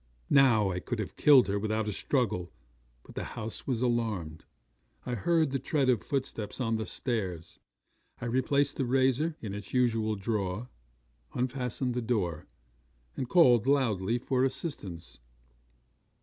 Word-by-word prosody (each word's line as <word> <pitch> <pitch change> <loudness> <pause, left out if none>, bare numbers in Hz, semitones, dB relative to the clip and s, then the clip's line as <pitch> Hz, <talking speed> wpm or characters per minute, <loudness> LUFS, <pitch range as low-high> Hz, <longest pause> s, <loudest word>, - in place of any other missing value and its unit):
'Now 120 -8 +5
I 90 - -2
could 120 +5 -4
have 110 -3 -5
killed 140 -4 +6
her 100 +1 0
without 110 +1 -1
a 105 - -2
struggle; 110 -11 -1 0.5
but - - -14
the - - -4
house 110 0 -5
was 125 -3 0
alarmed. 110 -10 -1 0.6
I 125 - -3
heard 155 - +2
the 135 - -1
tread 140 0 +1
of 120 -4 +3
footsteps 130 -6 -3
on 115 -3 0
the 110 - -4
stairs. 95 -10 -4 0.6
I - - -5
replaced 135 +4 +1
the 135 - 0
razor 135 +5 +2
in 105 -3 -5
its 105 +4 -7
usual 115 -3 +2
drawer, 100 +2 -2 0.7
unfastened 125 0 -2
the 125 - -1
door, 95 -10 -1 0.7
and 130 -3 -4
called 125 - +5
loudly 115 -6 +2
for 130 +1 0
assistance. 105 - -4
120 Hz, 145 wpm, -29 LUFS, 105-130 Hz, 0.7 s, killed